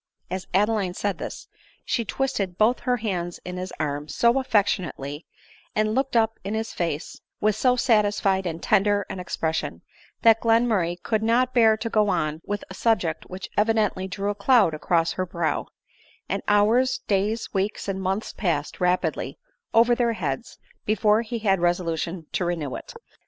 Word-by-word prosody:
As 185 Hz, 0 st, -4 dB
Adeline 200 Hz, -2 st, +1 dB
said 200 Hz, -4 st, -2 dB
this, -, -, -7 dB, 0.4 s
she 235 Hz, -, 0 dB
twisted 215 Hz, -6 st, -2 dB
both 225 Hz, +4 st, +3 dB
her 250 Hz, -1 st, 0 dB
hands 180 Hz, -6 st, -3 dB
in 180 Hz, 0 st, -5 dB
his 185 Hz, 0 st, -5 dB
arm 145 Hz, -1 st, -2 dB
so 235 Hz, -, +3 dB
affectionately, 180 Hz, -, -1 dB, 0.5 s
and 215 Hz, 0 st, +1 dB
looked 265 Hz, +1 st, 0 dB
up 225 Hz, -1 st, +2 dB
in 200 Hz, +3 st, -3 dB
his 220 Hz, +1 st, -3 dB
face 165 Hz, -3 st, -3 dB, 0.2 s
with 215 Hz, -1 st, +2 dB
so 250 Hz, +3 st, +3 dB
satisfied 205 Hz, -6 st, +2 dB
and 165 Hz, -1 st, -5 dB
tender 205 Hz, 0 st, +3 dB
an 190 Hz, -, -5 dB
ex 180 Hz, -, -5 dB
pression, 160 Hz, 0 st, -2 dB, 0.4 s
that 225 Hz, -1 st, +6 dB
Glenmurray 225 Hz, -7 st, +2 dB
could 220 Hz, -2 st, 0 dB
not 245 Hz, +3 st, +2 dB
bear 225 Hz, -3 st, +5 dB
to 220 Hz, +1 st, -4 dB
go 215 Hz, -2 st, +2 dB
on 155 Hz, -3 st, -1 dB
with 205 Hz, 0 st, -3 dB
a -, -, -9 dB
subject 185 Hz, -6 st, 0 dB
which 185 Hz, 0 st, -7 dB
evidently 210 Hz, -3 st, +1 dB
drew 200 Hz, +2 st, -2 dB
a -, -, -2 dB
cloud 205 Hz, -3 st, +4 dB
across 165 Hz, +2 st, +1 dB
her 185 Hz, -, -2 dB
brow; 170 Hz, -2 st, -1 dB, 0.6 s
and -, -, -2 dB
hours, 220 Hz, +5 st, +3 dB
days, 210 Hz, +3 st, 0 dB
weeks, 200 Hz, +1 st, -1 dB
and 190 Hz, -1 st, -2 dB
months 190 Hz, +3 st, -2 dB
passed 160 Hz, -7 st, -2 dB
rapidly 180 Hz, 0 st, 0 dB, 0.3 s
over 235 Hz, +1 st, +5 dB
their 235 Hz, -1 st, +1 dB
heads 230 Hz, +1 st, -4 dB, 0.3 s
before 215 Hz, +1 st, +3 dB
he 235 Hz, +1 st, -4 dB
had 195 Hz, -4 st, +2 dB
resolution 170 Hz, -1 st, -1 dB
to -, -, -1 dB
renew 165 Hz, -6 st, -2 dB
it. -, -, -9 dB
205 Hz, 170 wpm, -25 LUFS, 180-225 Hz, 0.6 s, that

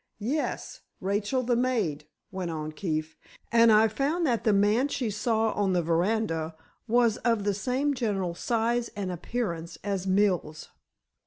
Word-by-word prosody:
"Yes, 265 Hz, +9 st, -3 dB, 0.2 s
Rachel, 205 Hz, +6 st, 0 dB
the 240 Hz, 0 st, +1 dB
maid," 215 Hz, -, 0 dB, 0.2 s
went 185 Hz, -2 st, -4 dB
on 155 Hz, -1 st, -4 dB
Keefe, 155 Hz, -1 st, -3 dB, 0.4 s
"and 230 Hz, 0 st, +6 dB
I 215 Hz, +1 st, +6 dB
found 285 Hz, -, 0 dB
that 240 Hz, -6 st, 0 dB
the 220 Hz, -, +5 dB
man 210 Hz, +6 st, +3 dB
she 245 Hz, -6 st, -2 dB
saw 220 Hz, +1 st, +1 dB
on 195 Hz, -2 st, 0 dB
the 175 Hz, -1 st, +1 dB
veranda 165 Hz, -1 st, 0 dB, 0.3 s
was 235 Hz, -1 st, +3 dB
of 230 Hz, -4 st, +1 dB
the 205 Hz, 0 st, +1 dB
same 260 Hz, +8 st, 0 dB
general 200 Hz, -8 st, -1 dB
size 235 Hz, +5 st, 0 dB
and 195 Hz, -3 st, -3 dB
appearance 175 Hz, -2 st, -4 dB
as 195 Hz, -2 st, -2 dB
Mills. 185 Hz, -5 st, +1 dB
210 Hz, 150 wpm, -27 LUFS, 180-235 Hz, 0.4 s, and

